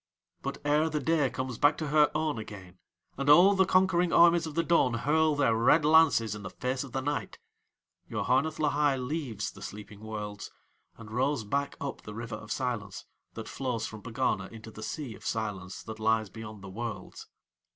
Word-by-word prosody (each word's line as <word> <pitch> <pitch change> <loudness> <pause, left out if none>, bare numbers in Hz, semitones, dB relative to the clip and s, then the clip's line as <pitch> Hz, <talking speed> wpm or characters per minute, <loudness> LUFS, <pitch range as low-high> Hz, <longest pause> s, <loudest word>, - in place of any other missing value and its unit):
But 140 +1 -4
ere 150 +2 +3
the 150 -1 -1
day 155 -4 +2
comes 130 -2 -5
back 145 +1 +4
to 155 -2 -3
her 150 0 +5
own 155 -5 0
again, 95 -4 -10 0.4
and 140 +1 0
all 180 +7 +8
the 190 -1 +3
conquering 185 -2 +3
armies 170 -1 +5
of 150 - -8
the 165 - +2
dawn 160 -8 +3
hurl 155 +5 +2
their 135 -6 +2
red 125 +7 +4
lances 150 -9 +5
in 105 - -7
the 95 - -6
face 125 +7 -3
of 135 - -10
the 135 - -2
night, 145 +1 -3 0.7
Yoharneth 140 +5 0
Lahai 145 -2 +2
leaves 130 -5 -3
the - - -14
sleeping 105 0 -9
Worlds, 105 -2 -6 0.5
and 110 -2 -11
rows 130 +2 0
back 140 +7 -2
up 140 - -5
the 105 - -9
River 115 0 -6
of 105 - -11
Silence, 115 -7 -3 0.3
that - - -6
flows 125 -4 -3
from 110 -1 -8
Pegana 115 +5 -1
into 110 0 -11
the 110 - -11
Sea 130 +1 -5
of - - -14
Silence 100 -4 -4
that 110 0 -8
lies 110 -1 +1
beyond 110 -3 -9
the 100 - -8
Worlds. 115 +3 -6
130 Hz, 190 wpm, -29 LUFS, 110-150 Hz, 0.7 s, all